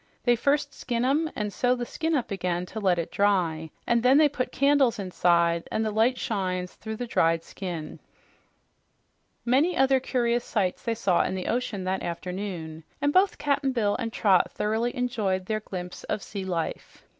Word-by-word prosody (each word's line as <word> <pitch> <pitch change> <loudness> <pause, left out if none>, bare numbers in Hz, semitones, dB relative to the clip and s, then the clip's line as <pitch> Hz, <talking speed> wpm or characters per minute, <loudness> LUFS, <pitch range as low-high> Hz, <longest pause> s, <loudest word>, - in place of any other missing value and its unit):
"They 240 -1 +4
first 280 +4 +1
skin 240 -1 -2
'em 305 +5 +2
and 210 -1 -3
sew 250 0 +2
the 245 -1 -4
skin 320 +5 -1
up 250 -6 -2
again 180 -2 -1
to 220 - -7
let 185 -4 +2
it 170 - -3
dry, 175 -6 +1 0.2
and 235 -1 +2
then 255 +3 +5
they 305 0 +6
put 265 -3 -3
candles 275 -4 +3
inside, 170 -3 +1
and 220 - 0
the 215 - -1
light 225 +4 +2
shines 185 -4 -2
through 220 0 -6
the 245 - -4
dried 165 -7 +2
skin." 175 -5 -6 1.5
Many 280 +9 +3
other 270 0 +4
curious 240 -2 0
sights 195 -7 -1
they 230 - -1
saw 195 -6 +2
in - - -2
the 185 - -4
ocean 230 -5 -2
that 185 +1 -1
afternoon, 175 -2 -5 0.2
and 290 0 +1
both 380 +1 +4
Cap'n 280 -2 0
Bill 210 -4 +1
and 230 - -3
Trot 195 -5 +3
thoroughly 225 +4 -1
enjoyed 215 -7 -1
their 215 +2 -1
glimpse 180 -4 -7
of 210 - -3
sea 200 -2 -6
life. 175 -3 -4
215 Hz, 180 wpm, -26 LUFS, 185-250 Hz, 1.5 s, they